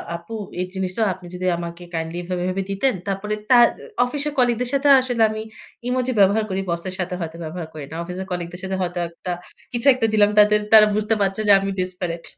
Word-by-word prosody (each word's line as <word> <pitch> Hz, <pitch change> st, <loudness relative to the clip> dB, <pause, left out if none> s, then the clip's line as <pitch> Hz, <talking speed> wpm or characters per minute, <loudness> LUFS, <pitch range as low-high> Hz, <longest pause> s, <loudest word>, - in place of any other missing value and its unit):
আপু 170 Hz, +6 st, -8 dB, 0.2 s
এই 180 Hz, -, 0 dB
জিনিসটা 190 Hz, +2 st, -3 dB
আপনি 185 Hz, 0 st, -14 dB
যদি 185 Hz, +1 st, -4 dB
আমাকে 170 Hz, 0 st, -7 dB
কাইন্ডলি 165 Hz, +1 st, -3 dB
এভাবে, 180 Hz, 0 st, -3 dB
এভাবে 185 Hz, +1 st, -1 dB
দিতেন, 255 Hz, +7 st, +2 dB
তারপরে 200 Hz, +2 st, -2 dB, 0.2 s
তার 240 Hz, -1 st, +8 dB, 0.4 s
অফিসের 290 Hz, +3 st, -3 dB
কলিগদের 245 Hz, -1 st, +2 dB
সাথে 280 Hz, +1 st, +2 dB
আসলে 245 Hz, -3 st, -2 dB
আমি 215 Hz, 0 st, -4 dB, 0.5 s
ইমোজি 255 Hz, 0 st, 0 dB
ব্যবহার 200 Hz, +3 st, +4 dB
করি, 190 Hz, 0 st, -1 dB
বসের 170 Hz, +2 st, -3 dB
সাথে 180 Hz, 0 st, -2 dB
হয়তো 165 Hz, -1 st, -5 dB
ব্যবহার 160 Hz, +1 st, -6 dB
করি 155 Hz, -2 st, -7 dB
না। -, -, -6 dB
অফিসের 180 Hz, +2 st, -6 dB
কলিগদের 175 Hz, 0 st, -4 dB
সাথে 190 Hz, 0 st, -2 dB
হয়তো 180 Hz, 0 st, -2 dB
একটা 170 Hz, +2 st, -7 dB, 0.4 s
কিছু 240 Hz, +3 st, -1 dB
একটা 250 Hz, -2 st, 0 dB
দিলাম 205 Hz, -1 st, +5 dB
তাদের 210 Hz, 0 st, +6 dB
তারা 215 Hz, -1 st, +9 dB
বুঝতে 215 Hz, +1 st, +1 dB
পারছে 195 Hz, +1 st, 0 dB
যে -, -, +6 dB
আমি 195 Hz, 0 st, -3 dB
ডেসপারেট 180 Hz, -2 st, -3 dB
190 Hz, 200 wpm, -22 LUFS, 175-220 Hz, 0.5 s, তারা